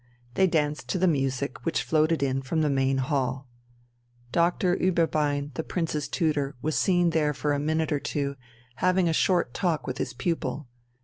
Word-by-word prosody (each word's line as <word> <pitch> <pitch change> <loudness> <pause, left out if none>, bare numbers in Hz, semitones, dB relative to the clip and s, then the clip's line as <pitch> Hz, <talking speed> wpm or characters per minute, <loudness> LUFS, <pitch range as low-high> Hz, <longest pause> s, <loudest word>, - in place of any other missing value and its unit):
They 190 +8 +3
danced 150 -3 -1
to - - 0
the 185 - +2
music 135 -3 -1
which 165 - 0
floated 155 -1 +2
in 135 0 0
from 155 +5 -1
the 150 - +2
main 135 0 +1
hall. 135 -1 -1 0.8
Doctor 175 +1 +2
Ueberbein, 150 -5 +1
the 160 - -3
Prince's 155 -5 -2
tutor, 145 -3 0
was 155 +4 -2
seen 175 -2 +3
there 150 -2 +1
for 145 +1 0
a 145 - 0
minute 155 +2 0
or 145 - +1
two, 140 -1 -2 0.4
having 185 +3 +2
a 165 - +1
short 175 -6 +2
talk 170 -5 -1
with 130 - -4
his - - -3
pupil. 165 -5 -2
150 Hz, 175 wpm, -26 LUFS, 140-170 Hz, 0.8 s, They